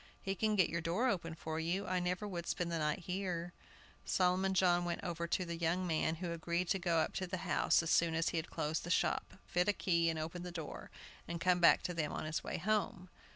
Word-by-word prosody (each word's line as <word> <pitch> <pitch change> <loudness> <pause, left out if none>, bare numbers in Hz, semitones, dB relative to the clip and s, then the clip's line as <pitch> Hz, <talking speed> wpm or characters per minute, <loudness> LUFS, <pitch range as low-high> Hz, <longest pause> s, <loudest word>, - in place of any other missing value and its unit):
He 195 - -2
can 215 +2 +1
get 185 -4 +4
your 170 0 -2
door 175 +10 +1
open 165 -6 -2
for 160 0 -4
you. 175 +5 -1
I 185 -1 0
never 180 +3 -1
would 175 -3 -5
spend 175 -1 -1
the 165 - -1
night 150 +3 0
here." 180 -2 -3 0.5
Solomon 185 +1 +2
John 175 -1 +4
went 175 -1 -3
over 170 -1 -3
to 180 +2 0
"the 170 -1 -4
young 170 +2 0
man," 160 -1 +1
who 175 +1 -4
agreed 170 +1 -1
to 195 - +2
go 170 -2 +1
up 160 - +1
to 185 - -2
the 185 +1 -3
house - - +3
as 165 - -1
soon 165 -1 +3
as 165 0 +1
he 170 - -2
had 160 - -3
closed 155 +2 -2
the 175 - -6
shop, - - +1
fit 180 +2 +1
a - - +4
key, 170 -4 +2
and 160 - -1
open 160 +3 -4
the 180 - -5
door, 165 -3 -7 0.4
and 170 0 -4
come 180 0 +3
back 175 - +6
to 180 - -2
them 155 -3 -1
on - - -4
his 155 +1 -2
way - - -3
home. 195 -1 -1
175 Hz, 245 wpm, -35 LUFS, 165-185 Hz, 0.5 s, back